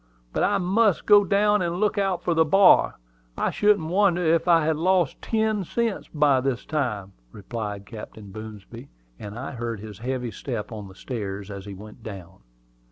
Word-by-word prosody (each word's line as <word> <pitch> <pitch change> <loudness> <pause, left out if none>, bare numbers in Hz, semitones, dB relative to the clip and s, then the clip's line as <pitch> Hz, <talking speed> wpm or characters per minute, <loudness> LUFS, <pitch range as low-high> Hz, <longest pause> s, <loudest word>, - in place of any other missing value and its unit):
But - - 0
I 205 - +3
must 195 +1 +2
go 205 -1 +7
down 205 +1 +3
and 170 -1 -1
look 210 0 +1
out 195 -4 0
for 175 - +1
the 165 0 +4
bar. 190 +5 +5 0.4
I - - 0
shouldn't 205 -6 +2
wonder 180 -1 +2
if 165 +1 +2
I 165 -3 +5
had 160 0 +2
lost 180 -2 +1
ten 220 -2 0
cents 230 +3 -2
by 145 -4 +3
this 135 -2 -2
time," 115 -11 -2 0.2
replied 105 - -6
Captain 105 -1 -10
Boomsby; 110 +4 -10 0.3
and 105 +2 -8
I 130 +3 -5
heard 115 -4 -4
his 105 -1 -10
heavy 125 0 -3
step 120 -3 -5
on 105 -3 -7
the 95 - -14
stairs 100 -3 -5
as 100 -1 -8
he 100 -1 -7
went 105 +4 -12
down. 95 -4 -9
135 Hz, 180 wpm, -25 LUFS, -, 0.4 s, go